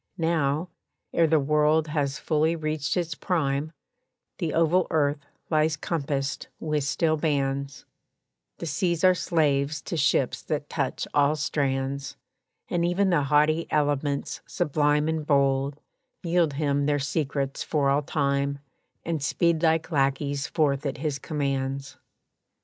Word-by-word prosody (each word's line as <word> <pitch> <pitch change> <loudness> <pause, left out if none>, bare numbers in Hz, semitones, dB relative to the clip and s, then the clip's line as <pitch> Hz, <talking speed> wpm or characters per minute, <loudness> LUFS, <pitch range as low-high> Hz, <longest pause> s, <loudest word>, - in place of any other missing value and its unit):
Now, 160 0 0 0.4
ere 165 - +4
the 160 0 +4
world 150 +2 +2
has 145 -2 -1
fully 160 +1 +1
reached 155 0 -2
its 170 -2 -1
prime, 150 -3 -1 0.7
The 165 - -1
oval 165 +3 +3
earth 145 -2 0 0.2
lies 155 -1 +2
compassed 140 -3 -2
with 150 -2 -1
steel 155 +2 +1
bands; 140 -2 -1 0.7
The - - -6
seas 170 +2 -1
are 185 0 +7
slaves 150 -4 +1
to - - -4
ships 140 -4 +1
that 150 -2 -4
touch 140 -5 -2
all 145 +1 +3
strands, 140 -2 -2 0.5
And 170 -1 0
even 185 +3 +2
the 150 -5 +2
haughty 150 +3 +3
elements 145 -1 0
sublime 150 0 +1
And 160 -1 -1
bold, 140 -1 +1 0.4
yield 170 -3 +2
him 140 -1 0
their 145 -1 +2
secrets 140 -1 -2
for 140 -3 +1
all 140 +1 +2
time, 140 -1 0 0.5
And 165 -3 -2
speed 165 +3 +1
like 160 0 +2
lackeys 140 0 0
forth 140 -3 +1
at 140 -3 -3
his 145 -1 -2
commands. 140 -2 -3
150 Hz, 135 wpm, -26 LUFS, 140-160 Hz, 0.7 s, are